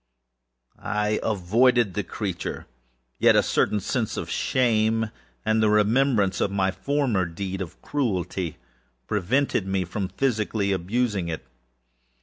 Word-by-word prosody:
I 105 0 0
avoided 110 +2 +2
the 105 - -1
creature; 95 -2 -4 0.6
a - - +6
certain 105 - +1
sense - - -2
of - - -4
shame, 110 -3 +1 0.3
and 110 0 +2
the 110 - +4
remembrance 105 -1 +3
of - - +2
my 95 -1 +1
former 130 -5 0
deed 95 +3 -5
of 90 - -7
cruelty, 95 - -2 0.5
preventing 105 0 0
me 95 -1 0
from 95 +3 -3
physically 105 -2 0
abusing 100 +1 0
it. 80 -6 -5
105 Hz, 120 wpm, -25 LUFS, 95-115 Hz, 0.6 s, a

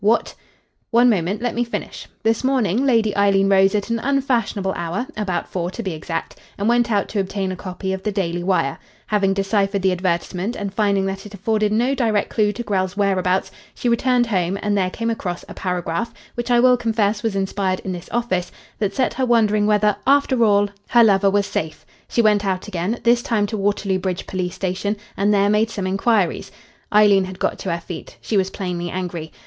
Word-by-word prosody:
What 225 +3 +2 0.3
" - - -46
"One 245 0 +6
moment. 195 +3 -1
Let 245 - 0
me 240 - 0
finish. 235 - -6 0.2
This 225 +2 +1
morning 255 -2 +1
Lady 225 -5 +2
Eileen 195 -1 +3
rose 195 +1 +4
at 210 +2 -1
an 230 - 0
unfashionable 245 -8 0
hour 170 +8 -3
about 190 -5 -2
four, 175 -1 -3
to 230 +5 -6
be 190 - -2
exact 165 +1 -5 0.2
and 200 - -1
went 240 0 +2
out 200 -2 +1
to 205 - -2
obtain 195 0 -2
a - - -4
copy 190 +1 -4
of 190 - -4
the 210 - -2
Daily 175 -4 -2
Wire. 175 -7 0 0.3
Having 195 -2 +1
deciphered 195 0 0
the 190 - +3
advertisement, 180 +3 -2
and 200 -2 -4
finding 200 -2 +1
that 195 +1 -4
it 205 - -11
afforded 210 +1 0
no 240 +5 +2
direct 225 -6 0
clue 210 -2 +2
to 210 +4 -6
Grell's 190 -2 -1
whereabouts, 190 -2 +1 0.2
she 245 - -1
returned 245 +1 +2
home 190 -4 0
and 205 -1 +1
there 185 -2 +1
came 230 +4 -2
across 180 -6 -4
a - - -9
paragraph 180 +3 -2 0.2
which 240 +1 -4
I 240 -1 +4
will 250 0 +5
confess 220 -3 0
was 220 -2 -1
inspired 190 -1 -1
in 190 - -4
this 175 -2 -7
office 230 -7 -1 0.3
that 200 -2 -1
set 260 - +1
her 260 - 0
wondering 215 -3 +3
whether, 210 -1 +3
after 275 -3 +4
all, 205 -1 +4 0.2
her 240 -1 +5
lover 200 -2 +4
was 200 0 +2
safe. 160 -6 -4 0.2
She 235 - +1
went 210 -1 +3
out 190 -1 -2
again 190 +3 -2
this 240 0 +4
time 220 -4 0
to 205 - -4
Waterloo 200 -1 0
Bridge 185 -1 -3
police 180 -1 -3
station 195 +3 -2 0.2
and 200 +2 +2
there 200 -1 +3
made 210 +2 +2
some 200 -4 -4
inquiries 195 -1 +1 0.2
" - - -36
Eileen 205 -2 +5
had 185 0 -8
got - - -1
to 190 - -3
her 170 - -1
feet. 170 0 -9
She 220 - -3
was 190 -1 +2
plainly 175 -3 -4
angry. 175 -3 -5
200 Hz, 210 wpm, -21 LUFS, 185-225 Hz, 0.3 s, One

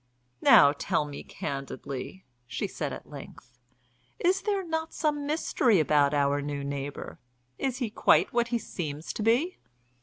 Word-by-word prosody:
"Now, 140 - +8
tell 150 - 0
me 145 -1 -7
candidly," 140 +5 -6 0.2
she - - -3
said - - -4
at - - -8
length. 125 0 -12 0.6
"Is 375 +2 +2
there 400 -3 -1
not 320 -1 -3
some 295 -2 0
mystery 260 - +2
about 145 -2 +3
our 145 -1 +2
new 145 0 -4
neighbour? 140 0 -5 0.4
Is 260 -2 -1
he 240 -5 -2
quite - - +3
what 240 0 +2
he 235 0 0
seems 155 -8 -5
to - - -4
be?" 245 - +2
185 Hz, 150 wpm, -28 LUFS, -, 0.6 s, Now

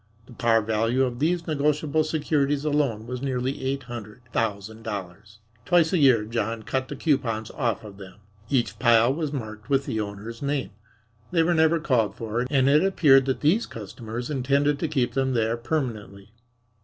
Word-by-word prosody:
The 125 - -14
par 115 -1 +2
value 115 +4 +1
of 125 -2 -2
these 165 +3 0
negotiable 150 0 +1
securities 150 -2 0
alone 140 -8 0
was 125 +1 -5
nearly 130 0 -2
eight 135 +1 -2
hundred 120 0 -9
thousand 110 0 -2
dollars. 105 -1 -7 0.3
Twice 170 +4 +3
a 180 - +3
year 125 -7 +5
John 115 0 -3
cut 130 +2 -2
the - - -6
coupons 120 -8 -1
off 115 -5 -2
of 100 -2 -11
them. 95 -1 -11 0.3
Each 115 -6 0
pile 120 +2 +5
was 155 -1 -3
marked 110 -6 -7
with 140 0 +2
the 110 - -2
owner's 105 +3 -7
name. 140 -3 -2 0.6
They 165 -2 +2
were 175 +2 +2
never 160 0 +3
called 125 -9 +1
for, 115 +2 -3
and 135 -2 +3
it 150 +4 +5
appeared 145 -9 +5
that 130 - -1
these 180 +11 +2
customers 115 +4 -7
intended 140 +2 +1
to 165 - -1
keep 135 -5 0
them 130 -1 0
there 115 0 +1
permanently. 110 -7 -4
125 Hz, 175 wpm, -25 LUFS, 110-145 Hz, 0.6 s, year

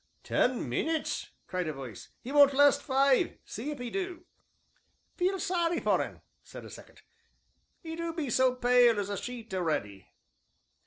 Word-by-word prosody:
"Ten 250 - +1
minutes!" 315 - -2 0.2
cried 180 -2 -3
a 155 - -2
voice; 130 -7 -9 0.2
"'e 260 - -5
won't 285 -1 +6
last 285 +1 +5
five 270 -1 +2
see 235 +8 -6
if 295 -3 -5
'e 245 -1 -5
do." 360 -3 -4 0.9
"Feel 375 +2 0
sorry 345 -3 0
for - - +2
un," - - -6 0.2
said - - -11
a - - -11
second, - - -14 0.8
"'e 325 -1 -6
do 335 0 -3
be 315 -6 -3
so 255 +1 +3
pale 245 -3 +4
as 200 0 -3
a 200 - -3
sheet 235 -4 -7
a'ready." 150 - -2
260 Hz, 160 wpm, -30 LUFS, 205-325 Hz, 0.9 s, won't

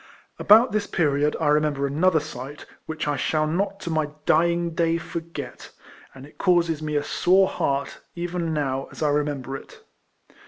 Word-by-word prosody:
About 225 +5 +6
this 210 -1 -1
period 150 -2 +1
I 155 -3 +1
remember 150 -2 +2
another 160 +5 +2
sight, 145 -1 -8 0.2
which 160 -1 -4
I 145 -1 0
shall 155 +2 +1
not 195 +5 -1
to 170 - -4
my 155 -2 0 0.2
dying 170 0 +2
day 165 0 +1
forget; 170 0 -7 0.5
and 135 0 -11
it 145 - -19
causes 170 -4 +2
me 150 -1 -3
a 145 - +1
sore 190 +5 +3
heart, 140 -4 -2 0.2
even 175 -1 -3
now, 135 -3 -1
as - - -6
I 150 - +3
remember 145 -2 -1
it. - - -11
155 Hz, 165 wpm, -24 LUFS, 145-170 Hz, 0.5 s, About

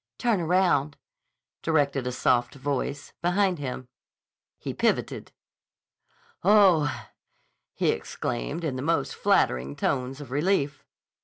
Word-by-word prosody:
"Turn 230 -7 +1
around," 165 -4 +2 0.6
directed 140 -5 +1
a - - -1
soft 120 0 +1
voice 140 +1 -3
behind 180 0 +1
him. 130 -2 -5 0.7
He - - -5
pivoted. - - -1 1.1
"Oh!" 170 - +4 0.7
he - - +1
exclaimed 145 +7 -4
in 140 -5 -2
the - - -3
most 165 +4 0
flattering 65 +3 +1
tones 130 - -1
of 140 -4 -10
relief. 145 -1 0
145 Hz, 105 wpm, -26 LUFS, 130-175 Hz, 1.1 s, Oh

